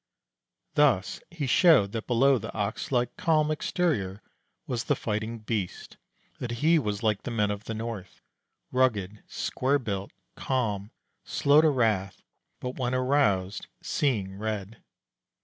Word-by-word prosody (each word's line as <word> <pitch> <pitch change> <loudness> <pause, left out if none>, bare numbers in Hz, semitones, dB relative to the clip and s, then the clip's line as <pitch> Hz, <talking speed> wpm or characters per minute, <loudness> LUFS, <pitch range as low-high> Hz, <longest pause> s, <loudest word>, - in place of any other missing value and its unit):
Thus 100 -10 +2
he 165 -4 -4
showed 130 - +5
that 115 0 -4
below 130 +2 +4
the 110 - -6
ox 105 +3 -2
like 125 -2 +1
calm 155 -2 +2
exterior 145 - -1 0.4
was 120 -3 -3
the - - +2
fighting 110 +1 -3
beast; 105 -4 -4 0.4
that 125 - -4 0.2
he 165 0 +6
was 105 -4 -3
like 105 -3 +1
the - - -5
men 105 -3 +1
of 105 +1 -5
the 110 - -4
north, 110 -4 -6 0.5
rugged, 110 -6 +1
square 135 +3 0
built, 100 -7 -4 0.2
calm, 105 -6 -1 0.3
slow 145 +2 +4
to 160 - +5
wrath, 110 -8 0 0.4
but 125 +1 -5
when 125 0 0
aroused 125 -8 +1 0.2
"seeing 105 -9 0
red." 110 0 -4
115 Hz, 135 wpm, -28 LUFS, 100-130 Hz, 0.5 s, he